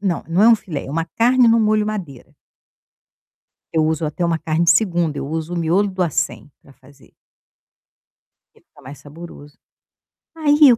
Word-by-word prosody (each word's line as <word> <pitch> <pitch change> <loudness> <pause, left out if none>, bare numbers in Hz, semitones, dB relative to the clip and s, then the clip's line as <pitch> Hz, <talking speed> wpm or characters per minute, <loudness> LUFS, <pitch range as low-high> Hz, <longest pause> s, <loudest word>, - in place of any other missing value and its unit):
não, 190 -4 -2
não 175 +5 +1
é 225 - +7
um 230 - +6
filé, 160 -9 -7
é - - -8
uma 165 +3 -2
carne 240 +8 +2
no 230 0 +4
molho 215 -1 +1
madeira. 180 - -7 1.4
Eu 160 -1 +1
uso 160 0 -1
até 155 +4 -3
uma 170 -1 0
carne 160 +2 -1
2ª, 170 -5 +2
eu - - -5
uso 160 +3 -4
o - - -4
miolo 175 +5 +1
do 185 -1 -3
acém 155 -2 -2
para 140 - -19
fazer 135 -1 -22 1.4
que - - -25
fica - - -23
mais 140 0 -11
saboroso. 145 0 -13 0.8
Aí, 295 -3 +5
o - - -1
170 Hz, 175 wpm, -19 LUFS, 155-210 Hz, 1.4 s, é